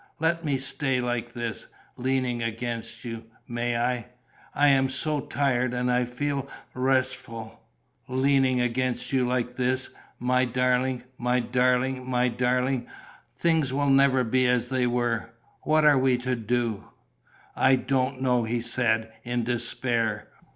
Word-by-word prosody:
"Let 165 Hz, +1 st, +1 dB
me 145 Hz, -3 st, 0 dB
stay 135 Hz, 0 st, 0 dB
like 120 Hz, -1 st, -2 dB
this, 120 Hz, -2 st, -5 dB, 0.3 s
leaning 130 Hz, -1 st, -1 dB
against 115 Hz, +1 st, -4 dB
you. 115 Hz, -1 st, -6 dB, 0.2 s
May 120 Hz, 0 st, -1 dB
I? 120 Hz, 0 st, -1 dB, 0.5 s
I 145 Hz, 0 st, +5 dB
am 135 Hz, -1 st, +3 dB
so 150 Hz, +2 st, -1 dB
tired 125 Hz, -3 st, 0 dB
and 125 Hz, 0 st, 0 dB
I 125 Hz, 0 st, +2 dB
feel 140 Hz, +2 st, -3 dB, 0.3 s
restful, 130 Hz, -3 st, -1 dB, 0.5 s
leaning 130 Hz, 0 st, +2 dB
against 125 Hz, +2 st, -1 dB
you 130 Hz, -2 st, +2 dB
like 125 Hz, 0 st, -1 dB
this, 130 Hz, +1 st, 0 dB, 0.3 s
my 125 Hz, +1 st, +2 dB
darling. 125 Hz, +1 st, +1 dB, 0.2 s
My 125 Hz, +1 st, +1 dB
darling, 125 Hz, +1 st, +1 dB
my 125 Hz, 0 st, +2 dB
darling... 125 Hz, +1 st, 0 dB, 0.5 s
things 160 Hz, -5 st, +1 dB
will 140 Hz, +1 st, +1 dB
never 135 Hz, -1 st, +4 dB
be 130 Hz, +2 st, +2 dB
as 125 Hz, -1 st, +1 dB
they 130 Hz, -2 st, +1 dB
were. 120 Hz, -2 st, -1 dB, 0.3 s
What 155 Hz, 0 st, +3 dB
are 145 Hz, -3 st, +6 dB
we 130 Hz, -1 st, +3 dB
to 125 Hz, +1 st, -1 dB
do?" 115 Hz, -2 st, -1 dB, 0.7 s
"I 130 Hz, 0 st, +5 dB
don't 130 Hz, 0 st, -1 dB
know," 125 Hz, -2 st, +2 dB
he 115 Hz, +2 st, -1 dB
said, 115 Hz, -1 st, 0 dB
in 120 Hz, 0 st, -2 dB
despair. 115 Hz, -2 st, -1 dB
125 Hz, 140 wpm, -26 LUFS, 120-130 Hz, 0.7 s, are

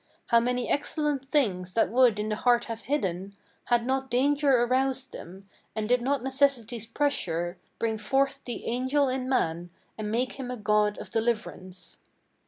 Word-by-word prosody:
How 235 Hz, -, +6 dB
many 245 Hz, +1 st, -1 dB
excellent 290 Hz, -2 st, -1 dB
things 185 Hz, -, 0 dB
that 225 Hz, -, +3 dB
would 245 Hz, -3 st, +4 dB
in 210 Hz, +1 st, -2 dB
the 215 Hz, -, 0 dB
heart 240 Hz, 0 st, +3 dB
have 230 Hz, -1 st, -6 dB
hidden, 195 Hz, -8 st, -2 dB, 0.3 s
Had 240 Hz, -1 st, +2 dB
not 265 Hz, +1 st, -1 dB
danger 275 Hz, 0 st, +3 dB
aroused 260 Hz, +1 st, 0 dB
them, 190 Hz, +3 st, -10 dB, 0.3 s
and 215 Hz, -1 st, -2 dB
did 250 Hz, +1 st, +3 dB
not 270 Hz, 0 st, 0 dB
necessity's 260 Hz, -5 st, 0 dB
pressure 175 Hz, -, -1 dB, 0.2 s
Bring 220 Hz, -1 st, -1 dB
forth 270 Hz, +5 st, +1 dB
the 240 Hz, -, -5 dB
angel 260 Hz, +4 st, +1 dB
in 255 Hz, 0 st, -2 dB
man, 175 Hz, -9 st, 0 dB, 0.3 s
and 210 Hz, -1 st, -3 dB
make 250 Hz, +5 st, -1 dB
him 255 Hz, -2 st, -5 dB
a 250 Hz, -, -4 dB
god 210 Hz, -1 st, +2 dB
of -, -, -9 dB
deliv'rance." 210 Hz, -6 st, -3 dB
240 Hz, 165 wpm, -27 LUFS, 210-265 Hz, 0.3 s, How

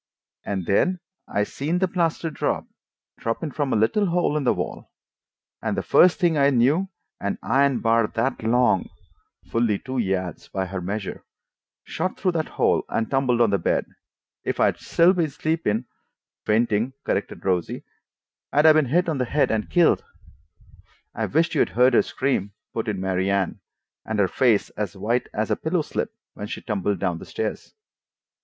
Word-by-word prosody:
And 95 Hz, -3 st, -3 dB
then 180 Hz, -, +2 dB, 0.3 s
I 105 Hz, -, 0 dB
seen 150 Hz, +10 st, -2 dB
the 190 Hz, +1 st, +2 dB
plaster 170 Hz, -2 st, -1 dB
drop, -, -, -1 dB, 0.5 s
droppin' 115 Hz, +7 st, -2 dB
from 140 Hz, -1 st, -2 dB
a -, -, +2 dB
little 115 Hz, -, +2 dB
hole 175 Hz, -3 st, +1 dB
in 150 Hz, -3 st, -1 dB
the -, -, +4 dB
wall. -, -, -5 dB, 0.7 s
And -, -, -2 dB
the -, -, -1 dB
first 180 Hz, 0 st, +5 dB
thing 170 Hz, -5 st, +2 dB
I 140 Hz, 0 st, +5 dB
knew, 140 Hz, +9 st, +2 dB, 0.3 s
an 100 Hz, -, -2 dB
iron 140 Hz, -1 st, +2 dB
bar 115 Hz, -1 st, +3 dB
that 115 Hz, +6 st, -2 dB
long" 115 Hz, -4 st, +2 dB, 0.6 s
(fully 115 Hz, -3 st, +2 dB
two 130 Hz, +2 st, -4 dB
yards 95 Hz, -5 st, -2 dB
by 95 Hz, -1 st, -3 dB
her 95 Hz, 0 st, -5 dB
measure) 100 Hz, +3 st, -4 dB, 0.6 s
"shot 185 Hz, -, -3 dB
through 185 Hz, -, +1 dB
that 160 Hz, -2 st, -1 dB
hole -, -, +3 dB
and 115 Hz, -, -1 dB
tumbled 130 Hz, -3 st, +2 dB
on 115 Hz, -3 st, +4 dB
the 100 Hz, -, +2 dB
bed. -, -, 0 dB, 0.6 s
If -, -, -2 dB
I'd -, -, +4 dB
been -, -, -21 dB
still 170 Hz, -1 st, +3 dB
sleeping" 140 Hz, -6 st, -1 dB, 0.6 s
("Fainting," 110 Hz, +2 st, +2 dB
corrected 100 Hz, -, -3 dB
Rosie) 90 Hz, -3 st, -1 dB, 0.7 s
"I'd 150 Hz, +2 st, +3 dB
'a' 160 Hz, -, +9 dB
been 155 Hz, -1 st, +3 dB
hit 170 Hz, +8 st, +1 dB
on 155 Hz, -5 st, -1 dB
the 125 Hz, -, +1 dB
head 145 Hz, +4 st, +1 dB
and 110 Hz, -1 st, -1 dB
killed!" 175 Hz, -, +3 dB, 1.1 s
"I -, -, -2 dB
wisht 165 Hz, +1 st, +1 dB
you'd 155 Hz, -, +2 dB
heard 125 Hz, +1 st, +5 dB
her -, -, +6 dB
scream," 115 Hz, -7 st, -1 dB, 0.2 s
put 115 Hz, -, -3 dB
in 105 Hz, -3 st, -2 dB
Mary 95 Hz, 0 st, 0 dB
Anne. 100 Hz, -2 st, 0 dB, 0.4 s
"And 110 Hz, -, -3 dB
her 100 Hz, -2 st, +3 dB
face 115 Hz, +1 st, +2 dB
as 105 Hz, -1 st, -4 dB
white 120 Hz, +5 st, -1 dB
as 110 Hz, +1 st, -2 dB
a -, -, +3 dB
pillow 160 Hz, 0 st, -1 dB
slip -, -, -3 dB, 0.2 s
when 105 Hz, -, -6 dB
she -, -, -5 dB
tumbled 100 Hz, -2 st, -1 dB
down 85 Hz, -1 st, -1 dB
the -, -, -10 dB
stairs." 110 Hz, -, -4 dB
120 Hz, 175 wpm, -24 LUFS, 105-155 Hz, 1.1 s, a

